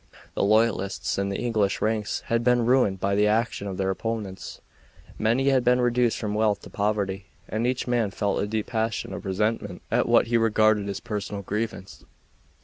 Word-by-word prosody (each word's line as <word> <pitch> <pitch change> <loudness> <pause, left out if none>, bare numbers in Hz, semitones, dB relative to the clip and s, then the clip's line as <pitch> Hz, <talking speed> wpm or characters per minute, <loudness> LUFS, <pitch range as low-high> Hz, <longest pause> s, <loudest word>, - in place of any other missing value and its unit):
The - - -2
loyalists 105 -2 +1
in 100 0 -1
the 100 - -2
English 110 -5 0
ranks 110 -1 -1
had 115 0 -1
been 120 -1 +3
ruined 120 -6 +3
by 100 +1 0
the 105 +1 +3
action 110 -1 0
of 95 -2 -5
their 95 0 0
opponents 105 -2 -5 0.6
many 120 +5 +2
had 130 -2 +3
been 125 +1 +3
reduced 120 -1 +2
from 105 -2 -3
wealth 105 -1 +1
to - - -11
poverty, 100 -2 -1 0.2
and 110 +3 -1
each 125 0 -1
man 120 -4 +1
felt 100 0 -1
a 105 - -1
deep 110 0 -2
passion 110 -2 -2
of - - -6
resentment 105 -1 -2
at - - +1
what - - +5
he 120 +1 +1
regarded 110 -2 +3
his 100 -1 -4
personal 100 -1 -4
grievance. 105 -1 -4
110 Hz, 185 wpm, -25 LUFS, 100-115 Hz, 0.6 s, what